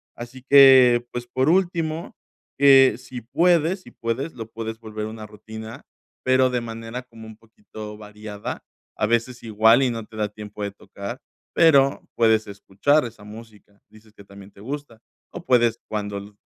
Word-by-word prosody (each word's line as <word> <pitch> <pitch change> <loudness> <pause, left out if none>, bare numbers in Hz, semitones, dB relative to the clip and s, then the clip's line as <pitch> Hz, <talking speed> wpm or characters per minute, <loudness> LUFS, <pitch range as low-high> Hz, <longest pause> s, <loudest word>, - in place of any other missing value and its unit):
Así 120 +2 -10
que, 130 -3 +7
pues, 120 0 -6
por 130 +4 0
último, 170 -3 -1 0.4
que 135 -1 +6
si 125 - -9
puedes 170 - +1
si - - -15
puedes, 120 +7 -4
lo 115 -2 -8
puedes 110 0 -6
volver 110 -1 -6
a - - -6
una 110 -1 -9
rutina, 110 +4 -10 0.4
pero 130 0 +3
de 125 -1 -2
manera 115 +1 -7
como 115 -3 -14
un 110 - -11
poquito 110 -1 -11
variada, 105 0 -8 0.3
a 105 - 0
veces 120 +2 -1
igual 110 +3 +4
y 130 - +2
no 115 -2 -5
te 110 - -17
da 105 -1 -2
tiempo 105 0 -9
de 100 - -3
tocar, 100 +4 -9 0.3
pero 140 -4 +4
puedes 110 -2 +2
escuchar 100 +9 0
esa 110 -3 -10
música, 105 -1 -14
dices 110 0 -20
que 100 - -15
también 100 0 -14
te - - -20
gusta 135 -2 -7 0.3
o 175 0 -9
puedes, 120 -2 +2
cuando 105 -1 -5
115 Hz, 165 wpm, -23 LUFS, 105-130 Hz, 0.4 s, que